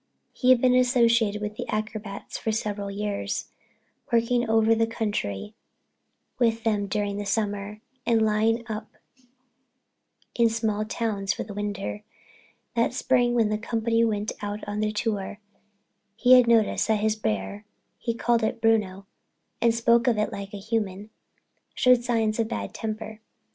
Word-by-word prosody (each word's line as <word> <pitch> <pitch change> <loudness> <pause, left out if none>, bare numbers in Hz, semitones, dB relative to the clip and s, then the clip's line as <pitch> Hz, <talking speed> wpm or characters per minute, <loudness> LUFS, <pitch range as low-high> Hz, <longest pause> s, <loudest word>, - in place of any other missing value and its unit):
He 255 - +1
had 255 -1 +7
been 250 0 +4
associated 235 -4 +3
with 210 0 -5
the - - -5
acrobats 215 -1 -4
for 220 - -2
several 205 -2 -3
years, 205 0 -3 0.6
working 235 0 +2
over 225 0 +4
the 225 0 +2
country 210 - -3 0.9
with 230 -2 +2
them 210 -3 0
during 205 0 -2
the 205 - -4
summer 205 0 -2 0.2
and 230 -2 +3
lying 220 +2 +1
up 215 -1 -5 1.5
in 235 -1 +3
small 220 -2 -1
towns 210 -3 -1
for - - -4
the 205 - -9
winter. 205 0 -4 0.7
That 235 +1 +1
spring, 245 -2 +2
when 225 -3 +3
the 215 0 -1
company 230 +1 0
went 215 -2 0
out 205 +1 -5
on 205 0 -3
their 215 0 0
tour, 210 -1 -3 0.8
he 245 +3 +5
had 250 -2 +7
noticed 225 -3 +3
that 220 -2 +2
his 215 0 +2
bear 110 - -3 0.4
(he 230 -1 -2
called 235 0 +1
it 220 - -1
Bruno 210 -4 +1 0.6
and 235 - +5
spoke 235 +1 +3
of 235 -3 +3
it 210 - 0
like 200 0 -6
a 205 - -6
human) 210 -1 -3 0.6
showed 250 -1 +4
signs 225 -2 0
of 225 - +1
bad - - -4
temper. 220 -1 -5
220 Hz, 155 wpm, -26 LUFS, 205-230 Hz, 1.5 s, had